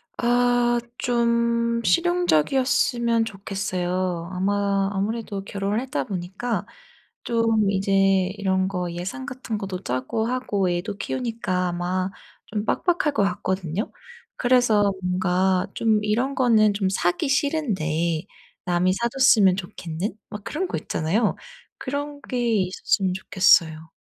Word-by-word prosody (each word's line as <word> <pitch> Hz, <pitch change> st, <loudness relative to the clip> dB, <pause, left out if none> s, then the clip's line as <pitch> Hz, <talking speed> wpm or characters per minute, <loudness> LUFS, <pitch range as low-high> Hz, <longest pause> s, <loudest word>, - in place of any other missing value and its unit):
아 245 Hz, 0 st, +2 dB, 0.2 s
좀 235 Hz, -1 st, +1 dB
실용적이었으면 255 Hz, -, +2 dB
좋겠어요. 185 Hz, -4 st, -3 dB
아마 200 Hz, +1 st, +1 dB
아무래도 205 Hz, 0 st, -3 dB
결혼을 200 Hz, +2 st, -2 dB
했다 145 Hz, -, -2 dB
보니까 195 Hz, +6 st, -3 dB, 0.6 s
좀 225 Hz, -3 st, +2 dB
이제 195 Hz, 0 st, -1 dB, 0.5 s
이런 190 Hz, -1 st, +1 dB
거 180 Hz, -2 st, -3 dB
예산 190 Hz, +10 st, -5 dB
같은 255 Hz, -5 st, -5 dB
것도 195 Hz, -2 st, -5 dB
짜고 130 Hz, -, -2 dB
하고 210 Hz, -7 st, 0 dB
애도 180 Hz, +4 st, -3 dB
키우니까 225 Hz, -8 st, -2 dB
아마 180 Hz, +2 st, -1 dB, 0.4 s
좀 210 Hz, 0 st, -3 dB
빡빡할 340 Hz, -5 st, +1 dB
것 205 Hz, -, +2 dB
같거든요. 185 Hz, +1 st, -2 dB, 0.4 s
그래서 245 Hz, -5 st, +3 dB
뭔가 180 Hz, 0 st, +1 dB
좀 220 Hz, -2 st, +2 dB
이런 240 Hz, +6 st, 0 dB
거는 220 Hz, -5 st, +4 dB
좀 195 Hz, -2 st, 0 dB
사기 175 Hz, +2 st, 0 dB
싫은데 180 Hz, -, 0 dB, 0.4 s
남이 180 Hz, +1 st, +2 dB
사줬으면 235 Hz, -5 st, +4 dB
좋겠는 175 Hz, 0 st, -5 dB, 0.2 s
막 210 Hz, -1 st, -8 dB
그런 360 Hz, +5 st, -3 dB
거 -, -, -3 dB
있잖아요. 200 Hz, +8 st, 0 dB, 0.4 s
그런 285 Hz, +1 st, -4 dB
게 250 Hz, -, -4 dB, 0.3 s
있었으면 185 Hz, +1 st, 0 dB
좋겠어요. 165 Hz, -4 st, +3 dB
200 Hz, 260 characters per minute, -24 LUFS, 185-235 Hz, 0.6 s, 거는